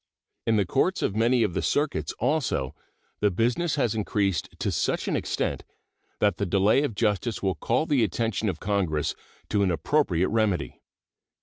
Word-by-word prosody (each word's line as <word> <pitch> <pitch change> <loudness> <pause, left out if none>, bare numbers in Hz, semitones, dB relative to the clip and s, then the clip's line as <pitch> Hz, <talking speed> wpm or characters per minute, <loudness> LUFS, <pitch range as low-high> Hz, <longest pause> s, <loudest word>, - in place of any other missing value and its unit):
In 115 - +3
the 105 -2 +2
courts 180 - +1
of 100 - 0
many 115 +2 +3
of 95 - 0
the - - -1
circuits 145 0 0
also 125 - 0 0.5
the 105 - +3
business 120 - 0
has 125 -7 +1
increased 100 -4 0
to - - -1
such - - -1
an - - 0
extent - - -2 0.6
that 105 - +2
the 100 - -1
delay 100 +7 +3
of 145 -8 -2
justice 105 +1 0
will 95 -1 +2
call 120 - 0
the 140 -7 +2
attention 110 +1 -1
of 80 -4 -4
Congress 90 -7 0 0.4
to 105 - +1
an 100 - +3
appropriate 95 - +1
remedy. 105 -8 0
105 Hz, 170 wpm, -26 LUFS, 95-120 Hz, 0.6 s, In